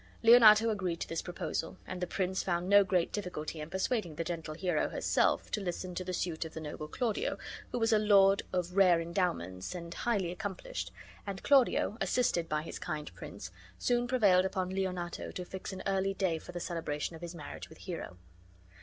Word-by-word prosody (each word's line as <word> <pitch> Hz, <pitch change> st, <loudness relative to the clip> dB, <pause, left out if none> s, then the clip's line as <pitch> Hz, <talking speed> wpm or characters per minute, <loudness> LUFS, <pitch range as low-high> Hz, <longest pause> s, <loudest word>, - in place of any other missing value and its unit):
Leonato 225 Hz, -1 st, +8 dB
agreed 185 Hz, -5 st, -2 dB
to -, -, -3 dB
this 165 Hz, -, -2 dB
proposal, 175 Hz, 0 st, -4 dB
and 185 Hz, -1 st, -6 dB
the 180 Hz, -, -1 dB
prince 185 Hz, +1 st, -1 dB
found 175 Hz, -1 st, -1 dB
no 200 Hz, +1 st, +7 dB
great 180 Hz, -3 st, +1 dB
difficulty 170 Hz, -6 st, -4 dB
in 150 Hz, -, -6 dB
persuading 190 Hz, -2 st, -1 dB
the 165 Hz, -, -2 dB
gentle 165 Hz, -2 st, -4 dB
Hero 175 Hz, -2 st, 0 dB
herself -, -, +1 dB
to 210 Hz, -, -1 dB
listen 180 Hz, 0 st, -4 dB
to 185 Hz, -, -3 dB
the 185 Hz, -, -4 dB
suit 170 Hz, -2 st, -2 dB
of 160 Hz, -, -9 dB
the -, -, -4 dB
noble 155 Hz, 0 st, -6 dB
Claudio 225 Hz, +5 st, -1 dB, 0.3 s
who -, -, -1 dB
was 225 Hz, -1 st, +2 dB
a 215 Hz, -, +5 dB
lord 200 Hz, -2 st, +5 dB
of 180 Hz, 0 st, -2 dB
rare 185 Hz, -4 st, +6 dB
endowments 165 Hz, -, -2 dB
and 170 Hz, -1 st, -6 dB
highly 205 Hz, -7 st, 0 dB
accomplished, 205 Hz, -, -5 dB, 0.4 s
and 195 Hz, -1 st, -5 dB
Claudio, 260 Hz, -5 st, +3 dB
assisted 195 Hz, -4 st, +1 dB
by 150 Hz, 0 st, 0 dB
his 165 Hz, -, -7 dB
kind 150 Hz, -, -4 dB
prince, 95 Hz, +1 st, -8 dB, 0.3 s
soon 245 Hz, 0 st, +1 dB
prevailed 205 Hz, -8 st, +4 dB
upon 185 Hz, -1 st, -1 dB
Leonato 180 Hz, -2 st, -3 dB
to 180 Hz, -, -6 dB
fix 190 Hz, +2 st, -6 dB
an 190 Hz, 0 st, -7 dB
early 195 Hz, 0 st, +1 dB
day 180 Hz, -5 st, 0 dB
for 180 Hz, -, -10 dB
the 175 Hz, -, -5 dB
celebration 165 Hz, -2 st, -3 dB
of 160 Hz, -, -11 dB
his 175 Hz, 0 st, -6 dB
marriage 150 Hz, -3 st, -8 dB
with 160 Hz, -, -14 dB
Hero. 165 Hz, -, -6 dB
180 Hz, 195 wpm, -32 LUFS, 165-195 Hz, 0.4 s, Leonato